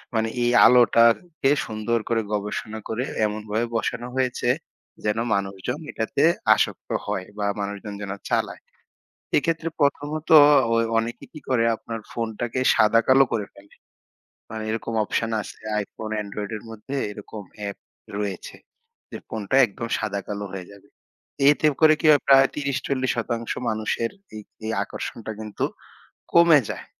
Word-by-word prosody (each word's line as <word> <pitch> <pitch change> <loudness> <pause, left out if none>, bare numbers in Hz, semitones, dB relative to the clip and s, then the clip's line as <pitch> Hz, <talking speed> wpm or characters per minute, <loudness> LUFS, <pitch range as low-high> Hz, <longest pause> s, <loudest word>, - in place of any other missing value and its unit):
মানে 110 0 +1 0.2
এই 120 - +2
আলোটাকে 125 +5 +4 0.2
সুন্দর 110 +2 -1
করে 115 -1 +2
গবেষণা 105 +1 -3
করে 115 +3 -1 0.2
এমনভাবে 105 +2 -2
বসানো 120 +1 -2
হয়েছে 125 -2 0 0.6
যেন 105 +1 +1 0.2
মানুষজন 100 +6 -2
এটাতে 110 +5 -1 0.3
আসক্ত - - -2 0.2
হয় 95 - -3
বা 105 - -1
মানুষজন 100 +1 -5
যেন 100 -1 -5 0.2
চালায়। - - -1 0.8
এক্ষেত্রে 165 +2 0
প্রথমত 145 +2 0 0.5
ওই 115 0 +3
অনেকেই 115 +1 -4
কি 155 - -10
করে 120 -3 +2
আপনার 115 0 -7
phone 115 -1 -3
টাকে 120 +1 -2 0.2
সাদাকালো 115 +5 +5
করে 110 -3 -1
ফেলে। 100 0 -18 0.8
মানে 110 0 -5
এরকম 115 +1 -3
option 110 +2 -1
আছে - - -10 0.3
iPhone, 110 +2 -8
Android 100 0 -6
এর - - -13
মধ্যে 110 +5 -7 0.2
এরকম 105 0 -9 0.3
app 100 - -8 0.4
রয়েছে 100 -2 -4 0.6
যে - - -5
phone 110 -2 -5
টা - - +4
একদম 115 +3 -6
সাদাকালো 100 -1 -4
হয়ে 95 -2 -7
যাবে। 100 -1 -17 0.6
এতে 150 +1 +3
করে 155 -1 +7
কি - - -3
হয় 145 - +5
প্রায় 135 0 +7
৩০-৪০% 130 -4 -2 0.2
মানুষের 110 +1 -1 0.3
এই, 110 - -6 0.2
এই 110 - -1
আকর্ষণটা 110 +1 -6
কিন্তু 105 -2 -3 0.7
কমে 170 -3 +7
যায়। - - -6
115 Hz, 140 wpm, -24 LUFS, 105-130 Hz, 0.8 s, করে